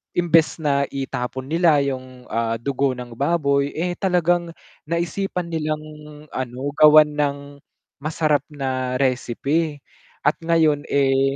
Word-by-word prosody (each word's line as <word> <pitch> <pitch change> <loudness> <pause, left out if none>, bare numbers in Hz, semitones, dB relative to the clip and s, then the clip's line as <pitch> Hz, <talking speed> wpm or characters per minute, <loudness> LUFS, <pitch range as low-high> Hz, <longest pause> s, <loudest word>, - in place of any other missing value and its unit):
imbes 165 -2 +2
na 140 -1 +1
itapon 130 -1 -4
nila 160 -2 +3
yung, 130 -2 -5
ah, 115 0 0
dugo 135 +2 -1
ng 125 -1 -8
baboy, 140 -2 +2
eh, 175 +2 -2
talagang 175 -2 +1 0.4
naisipan 170 +1 -2
nilang 155 -1 -2 0.5
ano 130 +2 -4
gawan 155 0 +8
ng 145 -1 +1 0.6
masarap 150 0 +1
na 130 -3 -3
recipe 140 +4 -1 0.4
at - - +2
ngayon, 160 -3 +2
eh, 135 -1 +2
145 Hz, 115 wpm, -22 LUFS, 135-165 Hz, 0.6 s, gawan